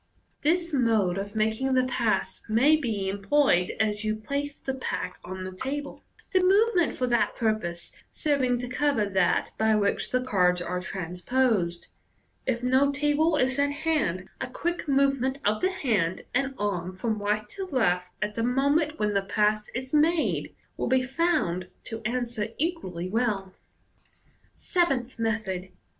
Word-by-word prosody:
This 340 +2 +1
mode 220 -8 +2
of 205 +2 -6
making 220 +5 +1
the 255 - +4
pass 235 -3 0
may 255 +8 +5
be 225 -10 -2
employed 200 -1 +2
as 210 0 0
you 215 0 0
place 280 +6 -4
the 265 - -3
pack 250 -8 -4
on 185 +1 -6
the 185 - -5
table, 275 +9 -5 0.3
the 370 - +4
move 405 +5 +4
ment 345 -4 +2
for 255 - 0
that 240 -2 +1
purpose 215 -7 -1 0.2
serv 290 -3 0
ing 250 -1 +2
to 245 +1 -4
cover 265 -3 +1
that 190 -2 +1
by 220 0 +4
which 200 -1 0
the 255 0 0
cards 180 -7 +2
are 180 +1 -3
transposed. 180 +1 -1 0.6
If 240 -2 0
no 260 +3 +3
table 295 +3 +2
is 260 0 +1
at 285 0 +3
hand 285 - -1
a 265 - -2
quick 340 +7 -3
movement 275 -1 +2
of 210 +1 +2
the 370 - +3
hand 200 - 0
and 270 +1 0
arm 185 -3 -2
from 215 +2 -2
right 210 +1 0
to 390 -1 -5
left, 180 - +1 0.2
at 210 0 -2
the 230 - -2
moment 285 +6 +2
when 210 -1 0
the 200 - +2
pass 210 +1 +1
is 260 +2 -4
made, 315 +2 +2 0.2
will - - -1
be 260 0 +3
found 265 - 0 0.2
to 225 0 -7
answer 235 -2 -1
equally 275 - -2
well. 200 -3 -1 1.0
Seventh 265 - 0
Method. 210 -5 -2
240 Hz, 160 wpm, -27 LUFS, 200-280 Hz, 1.0 s, may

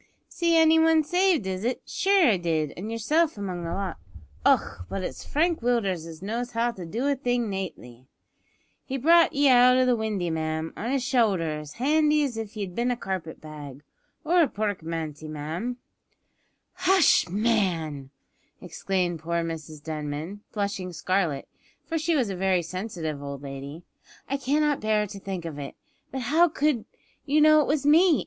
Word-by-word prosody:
"See 335 -1 +1
any 320 0 +6
one 320 -1 +4
saved, 355 - +2
is 190 +1 -3
it? 245 +2 -2
Shure, 390 -6 +3
I 205 - +3
did, 160 -4 -1
an' 200 +5 -6
yerself 295 +7 +1
among 185 -4 -4
the 165 - -3
lot. 195 -3 -3 0.5
Och! 90 - +1
but 195 - -3
it's - - -5
Frank 330 +3 +1
Willders 200 -9 0
as 165 +1 -10
knows 235 +4 -3
how 235 +1 +1
to 185 -7 -9
do 230 +10 -3
a 285 - +2
thing 245 -4 -1
nately. 130 -10 -7 0.8
He 270 - -4
brought 335 +6 +5
ye 285 0 +3
out 250 0 +6
o' 255 - +4
the 250 -1 +3
windy, 210 -6 -2
ma'am, 160 0 -2
on 230 - -4
his 270 -1 0
showlder 195 - +1
as 150 0 -10
handy 300 +3 +2
as 265 -5 -2
if 220 -1 -6
ye'd 195 -4 -4
bin 240 +5 0
a 245 - 0
carpet 185 -7 -5
bag, 145 -3 -10 0.4
or 345 +3 +4
a 315 - +4
porkmanty, 165 - -4
ma'am 160 +11 -4 0.5
" - - -46
"Hush, 370 - +5
man!" 180 - 0 0.5
exclaimed 180 0 -2
poor 170 +1 -1
Mrs 160 -2 -7
Denman, 155 +5 -5
blushing 200 -3 -3
scarlet, 170 -3 -1 0.4
for 325 -1 -2
she 325 +1 +1
was 245 -8 +1
a - - -4
very 185 -1 +1
sensitive 170 -4 -5
old 140 -1 -7
lady; 140 +4 -7 0.4
"I 275 - -1
cannot 290 +2 +1
bear 215 -1 +1
to 200 0 -9
think 190 -3 -5
of 155 -3 -6
it. 140 -1 -7 0.4
But 265 - -4
how 320 +8 +4
could 295 -6 0 0.4
you 295 +2 +2
know 310 0 +7
it - - -1
was 290 -1 0
me? 320 +2 +5
205 Hz, 175 wpm, -26 LUFS, 165-275 Hz, 0.8 s, know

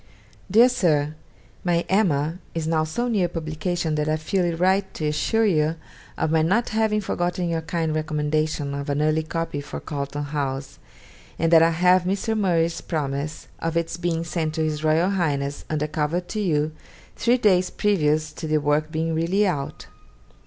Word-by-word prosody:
'DEAR 225 +6 +7
SIR, 155 - +1 0.5
My 175 -1 +1
"Emma" 170 -5 +1 0.2
is 165 -1 -1
now 160 -1 +1
so 160 +11 -2
near 205 -7 +2
publication 165 0 -2
that 150 0 0
I 155 - +1
feel 180 +4 0
it 170 -1 -1
right 190 +2 +2
to 155 - -3
assure 225 +9 +1
you 160 -5 +2 0.4
of 160 - 0
my 160 0 +3
not 200 +9 +2
having 215 -1 +1
forgotten 175 -2 -1
your 165 -1 -1
kind 160 -1 -2
recommendation 155 -1 -1
of 140 0 -4
an 145 0 0
early 155 +1 +2
copy 160 -2 -3
for 145 +1 -7
Carlton 145 0 -4
House, 140 -2 -4 0.6
and 165 +1 +1
that 165 - +8
I 165 - +5
have 180 +2 +3
Mr. 200 +4 0
Murray's 170 -5 +1
promise 145 -1 -3
of 165 0 -1
its 170 0 -1
being 170 -1 -1
sent 160 -2 -2
to 160 - 0
His 155 -1 -2
Royal 160 +4 +3
Highness, 145 -7 -1
under 150 -1 0
cover 150 +2 -1
to 180 +4 -5
you, 155 -6 +1 0.4
three 240 +2 +2
days 185 -6 +3
previous 155 -7 +1
to 160 - -6
the 155 0 +2
work 150 +1 +1
being 160 0 -1
really 170 +6 +2
out. 145 -8 -3
160 Hz, 175 wpm, -24 LUFS, 155-180 Hz, 0.6 s, that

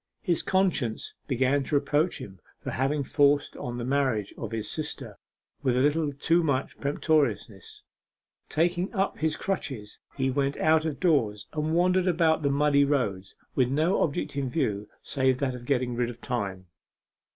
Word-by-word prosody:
His 175 -6 +1
conscience 180 - 0
began 135 +1 +2
to 150 - -1
reproach 145 +4 +1
him 95 -7 -10 0.2
for - - -5
having 140 +3 0
forced 145 +1 +2
on 120 -1 -5
the 120 - -3
marriage 130 -7 0
of 115 - -5
his 110 -2 -3
sister 155 - -4 0.5
with 130 -3 +1
a - - +3
little 150 +2 +2
too 165 +5 +2
much 140 -4 -1
peremptoriness. 140 - -1 0.7
Taking 175 +3 +1
up 195 0 0
his 155 0 +1
crutches 135 - -4 0.2
he 130 -1 +1
went 140 +1 0
out 160 0 +3
of 155 -3 -3
doors 115 - +1
and 155 +1 -1
wandered 180 +1 +3
about 165 -2 +3
the 140 - +1
muddy 140 0 +3
roads 105 -10 -1 0.2
with 125 -2 +2
no 155 +7 +2
object 145 -2 -1
in 140 -2 -1
view 105 -8 -1
save 130 -2 +1
that 130 -1 -1
of 125 -1 -8
getting 125 -2 0
rid 120 0 0
of 120 -1 -9
time. 100 -8 -3
140 Hz, 165 wpm, -27 LUFS, 125-155 Hz, 0.7 s, a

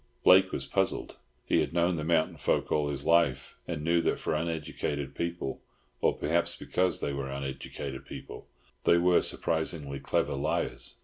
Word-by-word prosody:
Blake 95 +1 +7
was - - -3
puzzled. - - -1 0.3
He - - +3
had 75 - -1
known 85 +1 +2
the 75 - -3
mountain 80 0 +1
folk - - 0
all 75 -1 +2
his 70 -1 -3
life, 80 -6 +2
and 80 -4 -3
knew 85 +1 +3
that - - +1
for - - -2
uneducated 75 -3 -2
people—or 85 -5 -3
perhaps 85 +3 0
because 90 0 0
they 70 - -1
were 70 -1 -3
uneducated 70 0 -5
people—they 85 - -2
were 90 0 +4
surprisingly 80 -4 -1
clever 70 - 0
liars. 70 - -2
80 Hz, 150 wpm, -29 LUFS, 70-85 Hz, 0.3 s, Blake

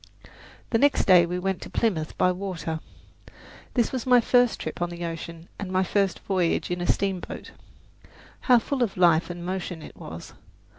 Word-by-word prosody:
The 225 - +3
next 285 +2 +3
day 180 -3 +6
we 180 +1 -2
went 190 +1 -2
to - - -8
Plymouth 170 -9 -1
by 180 - +3
water. 180 -4 -4 1.0
This 240 -3 +2
was 260 -1 -4
my 250 -1 +7
first 245 0 +3
trip - - -6
on 175 - 0
the 175 0 -5
ocean 165 0 -7
and 195 -2 -5
my 185 0 +2
first 195 0 0
voyage 180 -3 0
in 175 0 -2
a 175 - -2
steamboat. 195 -2 -2 1.0
How 250 - +8
full 260 +3 -2
of 225 -6 0
life 170 -2 +4
and 175 0 -6
motion 180 -3 -4
it - - -11
was! 80 +1 -9
185 Hz, 180 wpm, -26 LUFS, 170-205 Hz, 1.0 s, How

